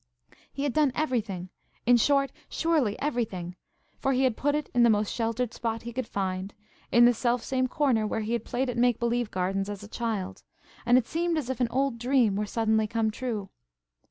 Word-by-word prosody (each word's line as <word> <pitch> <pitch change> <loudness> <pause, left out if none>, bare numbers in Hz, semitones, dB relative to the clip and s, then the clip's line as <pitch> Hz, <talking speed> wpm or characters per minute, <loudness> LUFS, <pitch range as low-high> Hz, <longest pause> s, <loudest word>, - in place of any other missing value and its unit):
He 275 - -4
had 285 -4 0
done 300 -3 +3
everything, 215 - -2 0.4
in 245 +1 +6
short–surely 280 -1 +1
everything! 200 -11 -2 0.4
For 270 -1 +1
he 260 +1 +2
had 255 -4 +2
put 290 +4 0
it 300 -2 -2
in 245 - +3
the 235 - +6
most 210 -1 +1
sheltered 230 +1 -1
spot 230 -1 -3
he 235 0 -6
could 255 -1 -3
find–in 200 +5 0
the 245 - +6
self 240 +1 0
same 255 -1 0
corner 250 -6 +1
where 220 - -2
he 220 +2 -2
had 235 -2 -1
played 260 +3 -2
at 245 -1 -3
make 245 -1 +3
believe 235 -1 0
gardens 195 +1 -1
as 205 -1 -6
a - - -9
child; 205 -5 -3 0.5
and 245 +1 +6
it 250 - +2
seemed 335 +3 -1
as 265 -4 -2
if 260 - -5
an 245 -2 +1
old 265 -1 0
dream 245 -4 +2
were 210 +1 -1
suddenly 220 0 +1
come 225 0 0
true. 215 -5 -4
235 Hz, 200 wpm, -27 LUFS, 215-260 Hz, 0.5 s, in